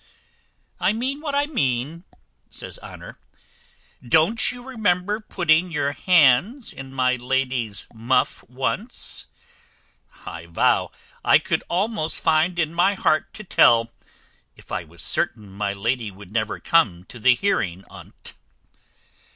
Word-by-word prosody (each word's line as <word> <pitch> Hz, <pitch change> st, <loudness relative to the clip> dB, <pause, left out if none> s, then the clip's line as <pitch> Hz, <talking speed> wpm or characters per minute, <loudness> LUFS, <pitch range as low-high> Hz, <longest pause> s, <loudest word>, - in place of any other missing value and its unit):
"I -, -, +2 dB
mean 260 Hz, +6 st, -3 dB
what 295 Hz, -3 st, -3 dB
I 285 Hz, 0 st, +2 dB
mean," 150 Hz, -, -2 dB, 0.4 s
says -, -, -8 dB
Honour. -, -, -11 dB, 0.8 s
"Don't 160 Hz, -, +3 dB
you 250 Hz, 0 st, -10 dB
remember 205 Hz, -4 st, 0 dB
putting 175 Hz, -4 st, +1 dB
your 145 Hz, -2 st, 0 dB
hands 180 Hz, -, +3 dB
in 135 Hz, 0 st, -9 dB
my 130 Hz, -1 st, +1 dB
lady's 125 Hz, -4 st, -1 dB
muff 115 Hz, +3 st, 0 dB
once? 130 Hz, -, -3 dB, 1.0 s
I 85 Hz, -, -8 dB
vow 85 Hz, -, +2 dB, 0.3 s
I -, -, +6 dB
could -, -, -1 dB
almost 185 Hz, -2 st, -1 dB
find 165 Hz, +2 st, +2 dB
in 165 Hz, -2 st, 0 dB
my 180 Hz, +4 st, +3 dB
heart 155 Hz, -4 st, +1 dB
to 215 Hz, -, -8 dB
tell, 115 Hz, -, +4 dB, 0.6 s
if -, -, -18 dB
I -, -, -2 dB
was 80 Hz, +1 st, -9 dB
certain 105 Hz, -4 st, -1 dB
my 100 Hz, +1 st, -2 dB
lady 115 Hz, +3 st, -1 dB
would 100 Hz, 0 st, -14 dB
never 110 Hz, -2 st, -1 dB
come 105 Hz, -, +2 dB
to 120 Hz, +5 st, -13 dB
the 125 Hz, +2 st, +5 dB
hearing 100 Hz, -, -1 dB
on't." -, -, -12 dB
140 Hz, 130 wpm, -23 LUFS, 115-190 Hz, 1.0 s, I